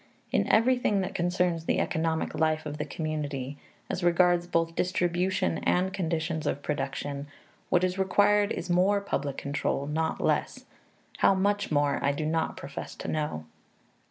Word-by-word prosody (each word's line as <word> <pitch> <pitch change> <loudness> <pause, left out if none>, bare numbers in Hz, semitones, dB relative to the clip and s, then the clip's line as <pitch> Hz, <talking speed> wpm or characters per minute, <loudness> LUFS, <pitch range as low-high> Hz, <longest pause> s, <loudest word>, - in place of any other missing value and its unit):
In - - +2
everything 230 -3 +3
that 190 +1 -3
concerns 175 -2 0
the - - +1
economic 160 0 -1
life 155 -1 +1
of 150 0 -5
the - - -1
community, 145 -3 -4 0.3
as 180 - -3
regards 175 0 +3
both 165 -1 0
distribution 180 0 0
and 185 +1 +1
conditions 165 -2 -2
of 140 - -2
production, 145 -1 -3 0.4
what 180 0 +3
is 185 +1 0
required 205 +2 +3
is - - -3
more 185 +3 +3
public 145 -8 -3
control, 140 0 -1
not 160 +2 -1
less - - 0 0.5
how 195 - +4
much 205 0 0
more, 145 -1 +1
I 140 0 +2
do 150 +2 -3
not 160 +1 -1
profess 140 +1 -7
to - - -7
know. 150 - -2
165 Hz, 155 wpm, -28 LUFS, 150-185 Hz, 0.5 s, how